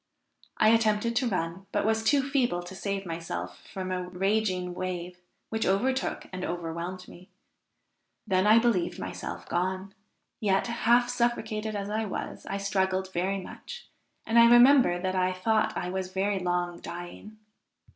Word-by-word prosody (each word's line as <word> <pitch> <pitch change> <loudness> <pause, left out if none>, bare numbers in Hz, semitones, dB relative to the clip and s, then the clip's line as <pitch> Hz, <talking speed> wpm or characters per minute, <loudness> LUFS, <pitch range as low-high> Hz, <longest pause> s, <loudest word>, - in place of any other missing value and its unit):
I 215 - +5
attempted 225 0 +2
to 250 - +2
run, 185 -1 -3
but - - 0
was 220 0 +1
too 275 +3 +3
feeble 245 -11 +1
to 175 +2 -9
save 195 0 -3
myself 165 -1 -5
from 185 -1 -4
a 180 -1 -2
raging 185 -1 0
wave, 180 0 -5 0.3
which 220 0 -1
overtook 260 +8 0
and 185 0 -4
overwhelmed 175 +2 -4
me. 180 +1 -14 1.0
Then 190 +1 +2
I 215 +2 +7
believed 230 -7 +2
myself 90 0 -6
gone; 185 +2 -2 0.5
yet, 195 -2 +2
half 240 +1 +3
suffocated 220 -3 -1
as 200 0 -3
I 220 +1 -1
was, 200 - -6
I 195 - -2
struggled 190 -1 -1
very 190 +3 0
much, 485 - -10 0.4
and 230 +1 +4
I 235 0 +8
remember 240 -6 +6
that 185 +1 -1
I 185 0 +1
thought 215 +4 +1
I 180 - -3
was 185 -1 -3
very 195 +1 0
long 175 -1 -1
dying. 175 +5 -9
195 Hz, 155 wpm, -28 LUFS, 180-220 Hz, 1.0 s, I